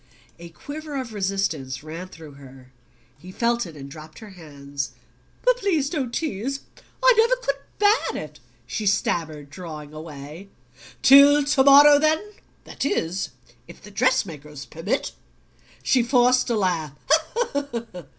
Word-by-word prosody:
A 170 0 -10
quiver 290 - -8
of 240 -4 -6
resistance 185 -10 -2
ran 165 +4 -7
through 160 -4 -12
her: 135 -2 -15 0.5
he 180 +5 -11
felt 235 +1 0
it 160 -3 -12
and 135 -1 -9
dropped 155 +2 -12
her 215 -2 -11
hands. 140 -5 -7 0.5
"Please 395 - +1
don't 270 -7 -2
tease. 275 -1 -3 0.4
I - - +7
never 465 +2 +4
could 275 - -3 0.2
bear 420 +2 +2
it," - - -16 0.3
she 215 - -3
stammered, 160 -7 -1
drawing 155 -3 -9
away. 155 +4 -10 0.5
"Till 285 +2 +8
to 280 -1 +3
morrow, 285 +1 +8
then; 315 +7 +1 0.3
that - - -6
is, 185 - -1 0.4
if - - -13
the 210 - -14
dress 255 +3 +2
makers 150 -4 -10
permit." 190 - -3 0.7
She 255 - +3
forced 250 +1 +3
a 235 - +1
laugh. 170 -7 -1
195 Hz, 135 wpm, -23 LUFS, -, 0.7 s, Till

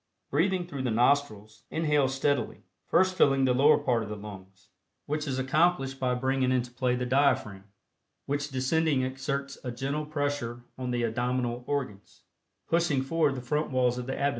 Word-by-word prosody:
Breathing 180 +5 +1
through 145 -6 -6
the 130 - -1
nostrils, 110 -3 +1
inhale 150 -4 +2
steadily, 135 +2 -1 0.2
first 185 +1 +3
filling 135 -7 +3
the 125 - +3
lower 145 +4 +5
part 120 -3 0
of 105 - -6
the 105 - -4
lungs, 95 -2 -12 0.4
which 150 +1 -2
is 130 -2 -2
accomplished 135 0 +1
by 125 -1 +1
bringing 130 0 +1
into 125 -1 0
play 125 0 0
the 125 0 -2
diaphragm, 130 -7 +1 0.6
which 145 +1 -2
descending 135 +1 +1
exerts 140 +1 -3
a 125 - -4
gentle 140 +5 -3
pressure 145 -5 -3
on 130 -1 -5
the 120 -1 -1
abdominal 120 +1 -1
organs, 125 -9 -4 0.4
pushing 165 -5 +1
forward 150 0 +1
the 125 - -5
front 150 +5 -1
walls 125 -1 +1
of 125 - -6
the 130 - -2
abdomen. 140 - +1
130 Hz, 170 wpm, -28 LUFS, 125-145 Hz, 0.6 s, lower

